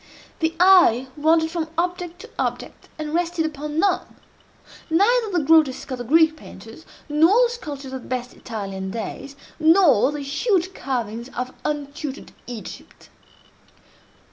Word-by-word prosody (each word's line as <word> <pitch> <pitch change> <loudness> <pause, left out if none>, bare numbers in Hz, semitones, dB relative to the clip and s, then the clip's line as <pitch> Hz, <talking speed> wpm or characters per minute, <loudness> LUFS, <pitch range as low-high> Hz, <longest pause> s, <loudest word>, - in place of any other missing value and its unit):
The 325 0 0
eye 350 -10 +6
wandered 320 +2 +2
from 330 -2 -2
object 355 0 -2
to 460 - -12
object, - - -4
and 305 -1 -5
rested 335 -1 0
upon 300 0 -5
none—neither 405 +3 -1
the 345 -4 +1
grotesques 290 -3 +3
of 255 - -4
the - - -4
Greek 320 +5 +4
painters, - - -13 0.2
nor 330 +10 +4
the 485 - +2
sculptures 285 - -7
of 260 - -5
the - - -14
best 250 -1 -4
Italian 195 -4 -6
days, 245 +6 -6 0.2
nor 315 - +5
the 295 -1 -5
huge 365 - 0
carvings 235 - -4
of 250 +1 -3
untutored 290 -1 -5 0.2
Egypt. 240 -3 -10
305 Hz, 135 wpm, -22 LUFS, 260-345 Hz, 0.2 s, eye